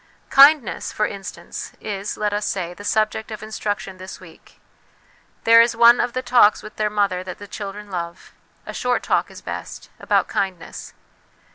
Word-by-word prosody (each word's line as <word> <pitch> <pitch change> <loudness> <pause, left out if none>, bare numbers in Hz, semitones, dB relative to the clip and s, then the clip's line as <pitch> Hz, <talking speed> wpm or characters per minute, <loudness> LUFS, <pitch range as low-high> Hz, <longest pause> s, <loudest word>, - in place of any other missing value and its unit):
Kindness, 280 -1 +5
for 215 - 0
instance, 195 -1 -7
is, 200 0 -5
let 210 -1 -1
us 205 0 -1
say, 175 -3 -3
the 200 - -12
subject 215 +1 0
of 215 -1 -7
instruction 205 -3 -4
this 185 +1 -9
week. - - -17 0.8
There 230 0 +8
is 230 0 +2
one 235 +1 +7
of 245 - 0
the 255 - -3
talks 240 -4 +4
with 215 - -11
their 215 -1 +1
mother 200 -3 0
that 185 -1 -7
the 205 - -10
children 205 0 -7
love 170 -1 -6 0.3
a - - -7
short 250 0 -1
talk - - +1
is - - -12
best - - -7
about - - +1
kindness. 190 -4 -4
210 Hz, 170 wpm, -21 LUFS, 195-230 Hz, 0.8 s, There